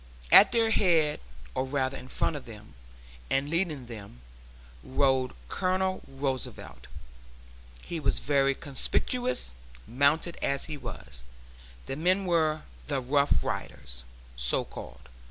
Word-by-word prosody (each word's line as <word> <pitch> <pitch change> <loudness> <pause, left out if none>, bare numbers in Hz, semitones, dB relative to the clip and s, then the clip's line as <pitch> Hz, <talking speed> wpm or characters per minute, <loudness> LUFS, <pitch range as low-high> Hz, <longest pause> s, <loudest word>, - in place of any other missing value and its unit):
At 195 - +9
their 230 -2 +2
head, 165 -8 +3 0.3
or 130 - 0
rather 135 0 -1
in 130 - -9
front 150 - -1
of 145 - -7
them 105 -2 -12 0.6
and 135 +2 0
leading 165 -6 -1
them, 100 - -10 0.6
rode 130 -1 +1
Colonel 185 - 0
Roosevelt. 135 -1 -4 1.0
He 170 - -4
was - - +1
very 140 -1 +3
conspicuous, 195 - -1 0.3
mounted 145 +6 +2
as 140 0 0
he 155 - -5
was. 65 - -9 0.6
The 135 - -4
men 185 +4 +2
were 155 -3 +1 0.2
the 140 -2 0
'Rough 140 +3 +2
Riders,' - - -4 0.3
so 60 0 +3
called. 65 0 -10
140 Hz, 120 wpm, -29 LUFS, 130-165 Hz, 1.0 s, At